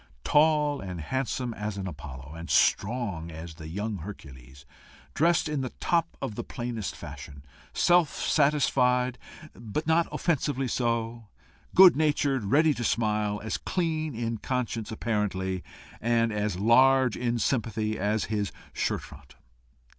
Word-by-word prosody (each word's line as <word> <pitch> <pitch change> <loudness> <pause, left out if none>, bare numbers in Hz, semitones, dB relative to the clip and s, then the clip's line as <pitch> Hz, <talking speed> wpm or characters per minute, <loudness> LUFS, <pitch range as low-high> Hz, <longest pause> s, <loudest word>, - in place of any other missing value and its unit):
tall 150 -1 +3
and 90 -3 -6
handsome 125 - -2
as 105 -1 -4
an 95 - -4
Apollo, 70 -4 -8
and 85 +1 -8
strong 100 -7 +1
as 80 0 -8
the 80 0 -10
young 105 +5 -3
Hercules, 70 -7 -11 0.5
dressed 170 +2 +2
in 150 -2 -1
the 130 - -3
top 170 -1 0
of - - -3
the - - -5
plainest 120 -4 -4
fashion, 70 -1 -10 0.3
self 175 -3 +4
satisfied, 130 -4 +2 0.3
but 120 +7 -4
not 165 +1 +3
offensively 145 -5 0
so, 115 -2 -1 0.5
good 185 -2 +9
natured, 145 -5 +1
ready 150 +8 +4
to 120 - -4
smile, 105 -3 0
as 110 - -2
clean 155 -5 -2
in 115 -1 -3
conscience, 120 -3 -3
apparently, 95 -5 -2 0.4
and 115 -1 +2
as 105 -3 -1
large 130 +4 +5
in 120 -1 -1
sympathy, 110 -2 -1
as 105 +2 0
his 105 -2 -2 0.2
shirt - - -1
front. 70 -1 -14
115 Hz, 135 wpm, -27 LUFS, 100-135 Hz, 0.5 s, good